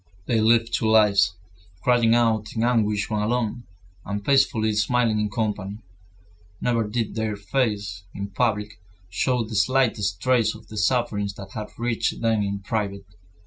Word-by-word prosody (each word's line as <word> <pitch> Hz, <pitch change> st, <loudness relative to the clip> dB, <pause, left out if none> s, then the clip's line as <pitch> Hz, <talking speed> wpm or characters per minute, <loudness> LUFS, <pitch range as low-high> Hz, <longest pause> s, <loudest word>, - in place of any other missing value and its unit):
They 115 Hz, +1 st, +1 dB
lived 115 Hz, +1 st, +3 dB
two 110 Hz, -, +1 dB
lives, 100 Hz, -4 st, +4 dB, 0.5 s
crying 120 Hz, -2 st, +4 dB
out 110 Hz, -3 st, +1 dB
in 110 Hz, -, 0 dB
anguish 105 Hz, -4 st, +1 dB
when 105 Hz, -1 st, -1 dB
alone, 120 Hz, +1 st, -1 dB, 0.4 s
and 100 Hz, 0 st, -5 dB
peacefully 115 Hz, -5 st, +3 dB
smiling 110 Hz, +1 st, +1 dB
in 105 Hz, 0 st, 0 dB
company. 105 Hz, -1 st, -3 dB, 0.8 s
Never 115 Hz, -3 st, 0 dB
did 115 Hz, +1 st, -2 dB
their 110 Hz, -1 st, -2 dB
faces, 100 Hz, -4 st, -2 dB
in 100 Hz, 0 st, -6 dB
public, 105 Hz, -3 st, -1 dB, 0.3 s
show 125 Hz, +6 st, +1 dB
the 110 Hz, 0 st, -8 dB
slightest 110 Hz, -4 st, +1 dB
trace 115 Hz, -1 st, +2 dB
of 110 Hz, -, -15 dB
the 110 Hz, -, -8 dB
sufferings 105 Hz, -2 st, 0 dB
that 95 Hz, -1 st, -10 dB
had 105 Hz, 0 st, -5 dB
reached 120 Hz, -1 st, -1 dB
them 115 Hz, -2 st, +1 dB
in 100 Hz, 0 st, -2 dB
private. 100 Hz, -1 st, -3 dB
110 Hz, 150 wpm, -24 LUFS, 100-115 Hz, 0.8 s, lives